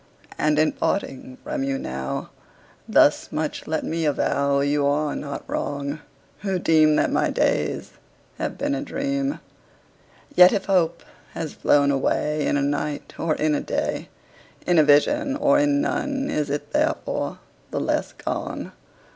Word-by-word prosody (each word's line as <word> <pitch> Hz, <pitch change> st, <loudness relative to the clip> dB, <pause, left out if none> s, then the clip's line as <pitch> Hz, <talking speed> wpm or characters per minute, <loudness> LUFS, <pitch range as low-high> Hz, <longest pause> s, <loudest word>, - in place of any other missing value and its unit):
And, 150 Hz, 0 st, +1 dB
in 155 Hz, 0 st, +3 dB
parting 130 Hz, -8 st, -3 dB
from -, -, -3 dB
you 135 Hz, 0 st, -1 dB
now, 65 Hz, -, -4 dB, 0.6 s
Thus -, -, +4 dB
much 155 Hz, 0 st, -3 dB
let 160 Hz, 0 st, -1 dB
me 165 Hz, +1 st, -2 dB
avow 140 Hz, -1 st, +1 dB
You 145 Hz, +1 st, +1 dB
are 145 Hz, +1 st, 0 dB
not 140 Hz, -1 st, -6 dB
wrong, 140 Hz, +1 st, -3 dB, 0.4 s
who 195 Hz, -2 st, -1 dB
deem 155 Hz, -3 st, +4 dB
That -, -, +2 dB
my -, -, +2 dB
days -, -, 0 dB, 0.5 s
have -, -, -3 dB
been 285 Hz, 0 st, -1 dB
a 285 Hz, -, -2 dB
dream: 275 Hz, 0 st, -2 dB, 1.0 s
Yet 180 Hz, -4 st, +8 dB
if 195 Hz, -, -1 dB
hope 170 Hz, -3 st, +1 dB, 0.3 s
has 160 Hz, -3 st, -4 dB
flown 140 Hz, -1 st, +3 dB
away 150 Hz, +2 st, 0 dB
In -, -, +2 dB
a 140 Hz, -, 0 dB
night, 145 Hz, +1 st, -2 dB
or 160 Hz, -2 st, +1 dB
in 155 Hz, 0 st, +1 dB
a 145 Hz, -, 0 dB
day, -, -, -2 dB, 0.6 s
In 175 Hz, -2 st, +4 dB
a -, -, +7 dB
vision 275 Hz, -, +3 dB
or 290 Hz, 0 st, +3 dB
in 290 Hz, -1 st, +2 dB
none, 280 Hz, -2 st, -1 dB
Is 150 Hz, -1 st, -1 dB
it 145 Hz, +1 st, -3 dB
therefore 315 Hz, +12 st, -1 dB, 0.3 s
the -, -, -2 dB
less -, -, -1 dB
gone? -, -, -4 dB
155 Hz, 155 wpm, -23 LUFS, -, 1.0 s, Yet